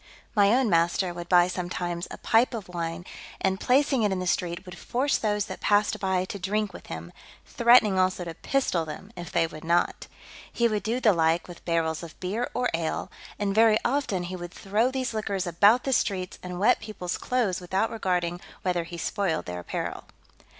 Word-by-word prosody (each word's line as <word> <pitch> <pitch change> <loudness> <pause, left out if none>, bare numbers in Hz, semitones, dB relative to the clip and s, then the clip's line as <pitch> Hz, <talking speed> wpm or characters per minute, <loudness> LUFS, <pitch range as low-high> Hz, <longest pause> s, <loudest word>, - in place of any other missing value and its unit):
My 205 -1 +5
own 255 +1 +3
master 175 0 +2
would 175 0 -8
buy 175 -1 +6
sometimes 175 -1 -3
a - - -8
pipe 235 +2 +2
of 215 -4 -6
wine, 170 0 -4 0.3
and, 190 0 0
placing 270 +1 +3
it 210 -2 +2
in 190 - 0
the 185 - -3
street, 180 0 -1
would 180 -1 -9
force 255 +10 0
those 210 -2 0
that - - -7
passed 205 0 +2
by 190 -1 0
to 200 - -6
drink 205 +1 -1
with - - -11
him, 80 +1 -7 0.3
threatening 235 -5 +5
also 185 -1 +1
to 165 - -5
pistol 185 -4 0
them 160 +7 -9
if 175 -1 -7
they - - +2
would 155 -1 -9
not. 170 +1 +1 0.4
He 235 - +2
would 215 -2 -1
do 230 +4 -1
the 220 -5 +4
like 165 0 +2
with 175 -1 -11
barrels 165 -2 0
of 165 -2 -10
beer 210 +7 -2
or 250 +1 +1
ale; 165 -1 -2 0.3
and 200 -1 -1
very 220 0 +5
often 240 -8 0
he 180 +1 -5
would 175 -1 -7
throw 210 +5 +1
these 260 -2 -2
liquors 200 -4 -2
about 205 +8 +4
the 270 - 0
streets, 185 -6 -1
and 180 -1 -6
wet 220 +6 +4
peoples' 185 -5 -5
clothes 225 -8 0
without 190 +5 0
regarding 180 -5 -1 0.2
whether 180 -2 0
he 170 +1 -8
spoiled 190 -2 -1
their 90 0 -5
apparel. 90 - -4
190 Hz, 200 wpm, -27 LUFS, 175-220 Hz, 0.4 s, buy